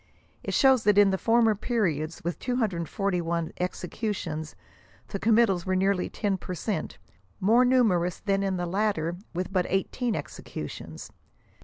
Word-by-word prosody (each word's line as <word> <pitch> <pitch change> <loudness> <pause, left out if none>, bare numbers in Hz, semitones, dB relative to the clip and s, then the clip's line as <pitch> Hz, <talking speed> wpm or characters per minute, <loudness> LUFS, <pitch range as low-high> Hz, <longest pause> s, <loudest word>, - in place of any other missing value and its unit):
It - - -3
shows 265 -4 +5
that 210 -1 +4
in 205 -1 +6
the 190 - +1
former 230 -1 +4
periods, 175 - -1
with 175 +1 -3
241 175 - -1
executions, 180 -3 -3 0.5
the 195 - -4
committals 215 -5 +3
were 185 - +1
nearly 190 0 +1
ten 200 -3 -1
per 180 - -6
cent, 205 +3 -3 0.4
more 225 +6 +5
numerous 215 -9 +2
than 195 -1 0
in 195 -1 0
the 175 - -2
latter 175 -3 -1 0.2
with 180 +2 -3
but 180 -2 +1
18 220 +4 -1
executions. - - -7
195 Hz, 140 wpm, -27 LUFS, 175-220 Hz, 0.5 s, in